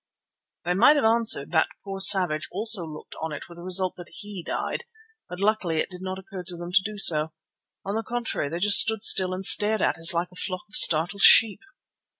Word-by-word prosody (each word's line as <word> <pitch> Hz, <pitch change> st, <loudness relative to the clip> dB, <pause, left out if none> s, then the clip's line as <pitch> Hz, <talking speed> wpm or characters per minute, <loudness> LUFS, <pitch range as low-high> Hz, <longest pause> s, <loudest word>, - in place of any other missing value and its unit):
They 175 Hz, -, -2 dB
might 240 Hz, +11 st, +3 dB
have 285 Hz, -, -1 dB
answered 225 Hz, -9 st, 0 dB
that 160 Hz, -2 st, 0 dB, 0.2 s
poor 195 Hz, -1 st, -8 dB
Savage 180 Hz, -6 st, +3 dB
also 205 Hz, -2 st, +1 dB
looked 150 Hz, -1 st, -13 dB
on 160 Hz, 0 st, -6 dB
it 150 Hz, -, -10 dB
with 170 Hz, -, -16 dB
the -, -, -12 dB
result 185 Hz, 0 st, -3 dB
that 175 Hz, -1 st, -13 dB
he 205 Hz, -3 st, -10 dB
died, 475 Hz, -, -6 dB, 0.4 s
but 180 Hz, -, -10 dB
luckily 200 Hz, -5 st, -2 dB
it 155 Hz, -, -4 dB
did 180 Hz, 0 st, -12 dB
not 185 Hz, 0 st, -7 dB
occur 190 Hz, 0 st, -11 dB
to 175 Hz, 0 st, -10 dB
them 175 Hz, +1 st, -10 dB
to 195 Hz, +2 st, +2 dB
do 210 Hz, +1 st, -8 dB
so. 155 Hz, -5 st, +2 dB, 0.5 s
On 200 Hz, -, -5 dB
the 220 Hz, -, -3 dB
contrary, 235 Hz, -11 st, -6 dB
they 165 Hz, -, -6 dB
just 200 Hz, +3 st, +6 dB
stood 220 Hz, -1 st, +3 dB
still 185 Hz, -4 st, +4 dB
and 185 Hz, +1 st, -6 dB
stared 215 Hz, +3 st, +4 dB
at -, -, -2 dB
us 165 Hz, +2 st, +3 dB
like 175 Hz, +1 st, -4 dB
a -, -, -19 dB
flock 185 Hz, -2 st, -6 dB
of 205 Hz, -, -22 dB
startled 170 Hz, +5 st, +3 dB
sheep. 220 Hz, -3 st, +4 dB
185 Hz, 220 wpm, -22 LUFS, 175-210 Hz, 0.5 s, just